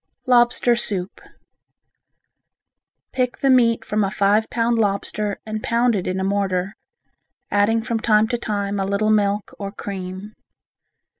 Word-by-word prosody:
Lobster 240 -1 +3
Soup 195 -5 -2 1.9
Pick 250 -1 -1
the 275 - +2
meat 230 -3 +3
from 210 -1 0
a 195 - 0
five 210 +2 +1
pound 235 0 0
lobster 205 0 -1
and 215 0 -4
pound 235 +1 +1
it 185 - -3
in 185 +1 -2
a - - -1
mortar, 195 0 -1 0.8
adding 215 +2 +2
from 230 -1 -2
time 215 -1 +3
to 240 - 0
time 205 -3 -2
a - - 0
little 205 +2 +1
milk 205 -1 0
or 200 -1 -5
cream. 195 0 -7
210 Hz, 140 wpm, -21 LUFS, 200-230 Hz, 1.9 s, Lobster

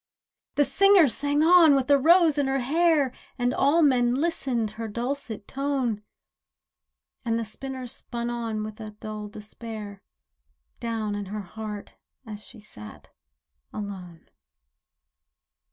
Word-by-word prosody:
The 290 - +4
singer 370 +4 +5
sang 285 +4 +1
on 330 -3 +7
with 270 -2 +1
a 285 - +7
rose 325 0 +5
in 280 - +1
her 270 0 0
hair, 300 -1 +2 0.2
And 245 0 0
all 300 +5 +3
men 245 -4 +3
listened 260 -8 -1
her 225 +1 -6
dulcet 235 -1 -4
tone; 265 -6 -1 1.2
And 230 -2 0
the 230 - -2
spinner 260 +4 -6
spun 235 0 -4
on 225 -3 -3
with 215 0 -8
a 215 - -6
dull 215 -1 -6
despair 210 -1 -9 0.8
Down 225 -3 -2
in 205 0 -4
her 210 +2 -5
heart 210 +1 -8 0.3
as 210 -2 -8
she 240 - -13
sat 105 - -12 0.6
alone. 190 -5 -8
240 Hz, 130 wpm, -26 LUFS, 215-280 Hz, 1.2 s, on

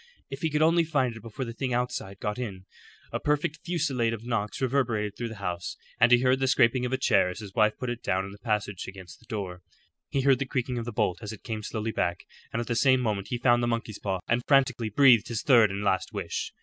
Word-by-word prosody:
If 135 - -6
he 160 - +1
could 150 +1 +2
only 165 +1 +4
find 135 -7 0
it 110 - -10
before 115 +4 -5
the 115 - -6
thing 125 0 -2
outside 110 -5 -3
got 105 +3 -3
in. 95 -6 -5 0.5
A - - -2
perfect 150 +1 0
fusillade 140 -10 0
of 115 +1 -12
knocks 110 -4 -2
reverberated 120 -6 0
through 120 - -4
the 110 - -7
house, 90 -4 -4 0.2
and 120 +2 +5
he 120 0 +6
heard 130 0 +3
the 135 - +1
scraping 125 0 +3
of - - -6
a 130 - +1
chair 110 -8 +3
as 90 - -6
his 100 -3 -8
wife 110 -1 +3
put 125 -1 -3
it 120 - -6
down 95 +1 0
in 100 - -8
the 100 - -13
passage 105 -3 -2
against 95 -3 -10
the - - -23
door. 95 -5 -5 0.5
He 140 -3 0
heard 135 -1 +4
the 135 - -2
creaking 125 -1 -2
of 115 - -5
the 120 - -4
bolt 90 -4 0
as 105 -1 -5
it 110 - -10
came 110 -3 -4
slowly 110 +1 -3
back, 85 -4 -2 0.3
and 115 - -2
at 120 - -2
the 120 - -2
same 130 +2 +4
moment 105 -5 -1
he 120 - -2
found 120 0 +3
the 120 - +1
monkey's 115 -3 -3
paw, 95 -3 -2
and 120 +1 +2
frantically 125 -5 +3
breathed 120 0 +5
his 115 -3 -3
third 120 -6 +6
and 100 +1 -4
last 95 -2 0
wish. - - -4
115 Hz, 255 wpm, -27 LUFS, 105-130 Hz, 0.5 s, he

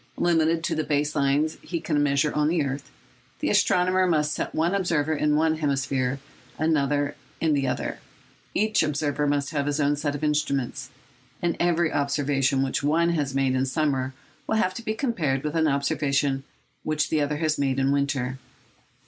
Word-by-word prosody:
Limited 165 -1 +2
to - - 0
the 155 - 0
base 145 0 0
lines 145 +2 +1
he 170 - -4
can 155 -2 0
measure 145 +1 +2
on 150 +1 +2
earth, 140 -1 -3 0.5
the - - -1
astronomer 185 +1 +3
must 150 -3 +1
set - - -4
one 165 +4 +1
observer 165 -6 +1
in 150 0 +1
one 160 +1 +2
hemisphere, 135 -3 0 0.4
another 145 -2 +1 0.3
in 160 -2 +2
the 140 -2 +1
other. - - -3 0.6
Each 215 +1 +2
observer 150 -1 0
must 145 0 0
have 145 -2 -1
his 145 +1 0
own 145 0 +2
set 145 0 -2
of 145 - -6
instruments; 145 -4 -1 0.5
and 170 -1 0
every 170 -2 +2
observation 140 -1 +1
which 135 +2 -1
one 160 +4 +2
has 145 -5 -1
made 135 -1 +2
in 130 +1 +1
summer 135 -3 -1 0.3
will - - +1
have 185 -4 +1
to 235 - -6
be 220 -2 -2
compared 165 - -1
with 150 +1 -3
an 160 -1 +3
observation 140 -1 0 0.4
which 155 -1 -1
the 155 - +2
other 145 +1 -1
has 155 -1 0
made 135 -2 +1
in 135 0 +2
winter. 135 -2 -1
145 Hz, 175 wpm, -25 LUFS, 140-160 Hz, 0.6 s, astronomer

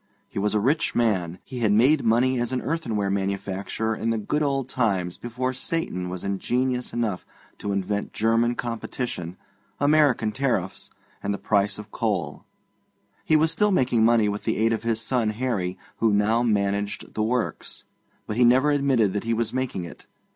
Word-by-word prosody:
He 100 - -5
was 105 +1 0
a - - +4
rich 140 +9 +1
man; 95 -7 +1
he 125 - -7
had 110 -3 +2
made 130 +8 +4
money 120 +3 +3
as 120 +1 -1
an 130 - 0
earthenware 115 -10 -1
manufacturer 100 +2 -2
in 115 - -2
the 115 - +1
good 130 +8 -1
old 135 -3 0
times 95 -9 -1
before 125 +2 -3
Satan 125 - -3
was 90 0 -6
ingenious 125 +6 -1
enough 115 -6 -2 0.4
to 100 - -3
invent 100 +1 -2
German 115 +2 +2
competition, 115 -6 -4 0.4
American 145 -6 +3
tariffs, 110 -7 -2 0.3
and 100 - -2
the 100 - -1
price 100 -1 +1
of 105 0 -10
coal; 95 -10 -2 0.8
he 155 - +3
was 160 +1 +3
still 210 +6 +2
making 125 - +2
money 115 -2 +4
with 105 0 -3
the 110 - 0
aid 115 +1 +2
of 110 - -2
his 115 -1 0
son 115 -1 0
Harry, 105 -6 -2 0.2
who 115 -1 +2
now 105 +3 +3
managed 100 -3 -1
the 110 - -2
works, 115 +2 -2 0.4
but 105 - -4
he 125 - +5
never 130 +5 +5
admitted 135 -8 +2
that 105 - -2
he 115 0 +1
was 115 -1 -1
making 130 -8 -2
it. 85 - -12
115 Hz, 175 wpm, -25 LUFS, 100-125 Hz, 0.8 s, he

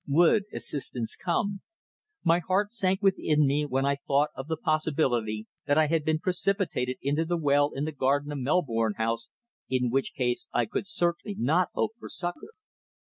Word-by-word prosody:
Would 175 +8 +4
assistance 125 -5 -2
come? 195 +3 -1 0.6
My 170 0 +4
heart 190 +4 0
sank 195 -3 0
within 155 -6 +3
me 145 +2 +1
when 135 0 0
I 140 0 +1
thought 140 +1 +1
of 135 - -7
the 160 0 -2
possibility 130 -9 0 0.2
that 145 0 +3
I 155 - +5
had 160 0 +1
been 155 +1 +1
precipitated 180 -7 -1
into 145 +4 +1
the 175 +1 -1
well 145 -2 +3
in 140 +2 -1
the 155 - -2
garden 145 +1 0
of 145 - -4
Melbourne 120 - +1
House, 115 +1 -1 0.4
in 125 -2 +1
which 135 +1 0
case 125 -2 -1
I 120 - +1
could 155 - -3
certainly 175 0 -1
not 160 +9 +2
hope 220 - +1
for - - -9
succour. 175 - -5
150 Hz, 175 wpm, -28 LUFS, 135-175 Hz, 0.6 s, I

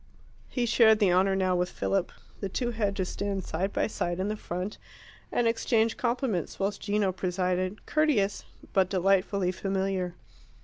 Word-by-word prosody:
He 245 -2 0
shared 225 -2 +5
the 200 -4 +3
honour 190 +1 +3
now 185 -1 +2
with 180 0 0
Philip. 195 -2 -1 0.3
The 195 - -3
two 240 +5 -1
had 210 -3 -1
to 190 - -1
stand 200 0 -3
side 185 +5 -2
by - - +1
side 175 -4 -2
in 195 +2 0
the 215 - -1
front, 185 0 -5 0.5
and 240 - +2
exchange 230 -1 +2
compliments, 235 - -1
whilst 200 +1 -2
Gino 205 -2 +1
presided, 185 +1 -1
courteous, 265 -11 +1 0.3
but 190 -2 +3
delightfully 190 0 +2
familiar. 190 -1 -2
195 Hz, 160 wpm, -28 LUFS, 185-215 Hz, 0.5 s, shared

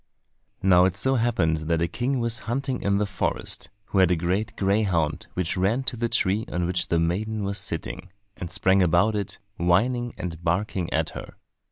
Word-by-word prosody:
Now 90 -1 +6
it 95 -1 +1
so 130 +7 +1
happened 115 -10 +2
that 80 +1 0
a 85 - +1
king 125 +7 -1
was 115 0 -1
hunting 135 +1 -1
in 100 0 +2
the 105 - +1
forest, 100 -2 -3 0.2
who 100 - +1
had 95 -2 +6
a 90 - +3
great 90 +6 -1
greyhound 95 -6 +1
which 90 -2 -1
ran 100 +8 +1
to 130 - -3
the 115 0 -1
tree 100 +2 +1
on 90 0 0
which 90 +1 -1
the 85 - +1
maiden 100 +6 0
was 100 0 -1
sitting, 90 - -5 0.3
and 85 - -6
sprang 95 +2 +3
about 90 +5 +3
it, 100 -2 -3 0.2
whining, 120 +8 +1
and 85 -2 -5
barking 90 0 -1
at - - 0
her. - - -9
95 Hz, 190 wpm, -25 LUFS, 85-110 Hz, 0.3 s, Now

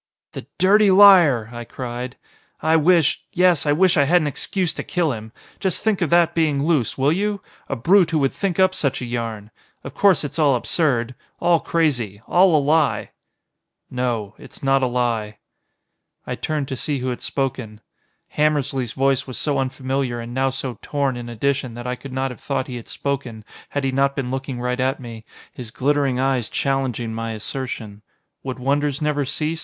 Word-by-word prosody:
"The - - -9
dirty 205 +2 +5
liar!" 175 - +6
I 120 0 -6
cried. 125 +1 -6 0.4
"I 160 +1 +2
wish 165 -1 +3
yes 180 -4 +3
I - - +4
wish 175 +4 +3
I 140 - +4
had 175 +5 +4
an 155 - -2
excuse 175 +5 -1
to - - -5
kill 175 -4 0
him. 110 -2 -7 0.3
Just 190 -3 0
think 215 -4 +1
of 170 - +1
that 170 -1 +4
being 150 -4 +1
loose, 155 -9 +1
will 135 +2 +2
you? 200 +4 -1 0.3
A 135 - -1
brute 175 - +4
who 165 - 0
would 135 -3 +1
think 195 -3 -2
up 185 0 +4
such 140 -7 -1
a - - -3
yarn! 115 -3 -5 0.3
Of - - -8
course 195 -5 +3
it's 145 +2 -5
all 145 -4 +4
absurd. 125 -2 0 0.3
All 170 -1 +3
crazy. 125 - -1
All 180 -1 +4
a - - +6
lie." 150 0 +1 0.8
"No. 120 -5 -2
It's - - -12
not 135 0 +3
a 130 - +2
lie." 115 -4 -1 0.9
I - - -4
turned 150 -3 -2
to 130 - -3
see 145 +3 -2
who 130 0 -3
had 125 - -4
spoken. 125 -6 -3 0.6
Hammersly's 140 -5 0
voice 135 -1 +1
was 130 - -6
so 145 -2 0
unfamiliar 130 -1 -2
and 115 +1 -7
now 135 +1 +1
so 130 -1 -5
torn 140 -3 -1
in 120 -1 -7
addition 130 +1 -1
that 120 0 -8
I 125 - -2
could 135 +1 -10
not 130 0 -2
have 125 - -11
thought 140 -2 -2
he 125 -2 -6
had 115 - -10
spoken, 130 -6 -4 0.2
had 145 - -3
he 135 - 0
not 140 +1 +1
been 130 -3 -3
looking 135 -1 -4
right 125 +1 -2
at 130 +1 0
me, 115 -3 -9 0.3
his 120 -3 -8
glittering 135 +2 0
eyes 130 -3 0
challenging 130 -4 -1
my 115 0 -4
assertion. 110 -2 -6 0.4
Would 130 -1 -5
wonders 140 +2 0
never 150 -2 0
cease? 155 +4 -2
135 Hz, 190 wpm, -21 LUFS, 125-155 Hz, 0.9 s, liar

